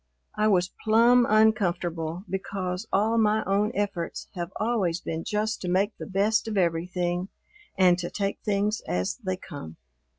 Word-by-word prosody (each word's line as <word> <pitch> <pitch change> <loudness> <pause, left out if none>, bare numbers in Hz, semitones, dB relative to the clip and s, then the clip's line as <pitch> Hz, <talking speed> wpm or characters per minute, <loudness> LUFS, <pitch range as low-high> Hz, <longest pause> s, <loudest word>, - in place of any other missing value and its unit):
I 215 - +2
was 185 -3 +2
plumb 235 +2 +5
uncomfortable, 175 -6 +1
because 190 +1 -4
all 220 +4 +2
my 215 0 +3
own 205 +3 +1
efforts 200 -5 -3
have 175 -2 -5
always 210 -7 0
been 165 -2 -4
just 215 +1 -1
to 180 - -4
make 195 +4 +1
the - - -6
best 210 +4 +1
of 215 -2 -2
everything 175 +1 0 0.5
and 180 -1 +5
to 175 - -3
take 200 -1 -2
things 210 +1 0
as 90 +1 -1
they 185 -6 -3
come. 110 - -9
195 Hz, 155 wpm, -26 LUFS, 175-215 Hz, 0.5 s, plumb